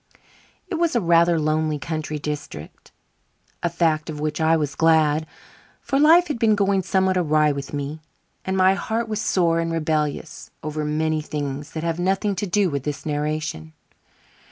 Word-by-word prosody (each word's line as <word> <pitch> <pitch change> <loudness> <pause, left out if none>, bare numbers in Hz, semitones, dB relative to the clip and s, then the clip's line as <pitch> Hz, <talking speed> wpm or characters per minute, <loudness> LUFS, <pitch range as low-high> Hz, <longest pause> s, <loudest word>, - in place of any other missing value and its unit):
It 340 -5 -3
was 340 -5 +1
a - - +4
rather 170 -2 +3
lonely 155 0 0
country 155 0 -4
district 145 - -7 0.7
a 170 - 0
fact 160 -2 0
of 150 -1 -5
which 150 +1 -2
I 160 +1 +4
was 145 -2 -2
glad, 160 -1 +3 0.5
for 275 - -1
life 330 +4 +6
had 290 -6 -3
been 220 -2 +4
going 200 -1 +2
somewhat 190 0 +1
awry 155 -3 +3
with 140 -1 -5
me 145 +2 -5 0.4
and 190 0 -2
my 190 0 +5
heart 220 +4 -2
was 215 -1 -2
sore 170 -5 +2
and 165 0 -1
rebellious 155 -2 -2
over 155 0 -3
many 155 +1 0
things 145 -1 -5
that 160 - -4
have 165 0 -2
nothing 195 +3 +1
to 205 - -2
do 200 +2 +2
with 140 -4 -2
this 145 +2 -5
narration. 150 - -3
160 Hz, 170 wpm, -23 LUFS, 150-190 Hz, 0.7 s, life